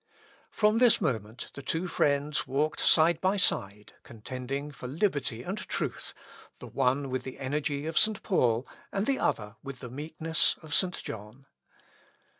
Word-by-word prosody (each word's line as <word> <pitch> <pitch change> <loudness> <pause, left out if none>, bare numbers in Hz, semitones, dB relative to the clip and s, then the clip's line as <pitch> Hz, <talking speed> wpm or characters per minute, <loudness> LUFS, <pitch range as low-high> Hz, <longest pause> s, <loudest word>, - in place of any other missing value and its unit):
" - - -29
From 215 +1 +3
this 245 -2 +6
moment 115 -5 -3
the 140 - -8
two 160 +6 -2
friends 145 -3 +1
walked 145 +4 0
side 165 +1 +4
by 190 +2 +2
side, 105 - 0
contending 130 +5 -5
for 125 -2 -8
liberty 140 - 0
and 195 +8 -3
truth, - - -4 0.4
the - - -10
one 135 +1 0
with 130 -1 -1
the 130 0 -8
energy 145 +1 -2
of 160 0 +2
St. 215 -1 +3
Paul, 120 - +2 0.2
and 195 +1 0
the 270 +2 +1
other 105 +1 -1
with 135 -1 -7
the 125 -2 -9
meekness 155 +3 0
of 155 -2 -6
St. 180 +2 +2
John. 110 +5 -8
140 Hz, 160 wpm, -29 LUFS, 125-165 Hz, 0.4 s, this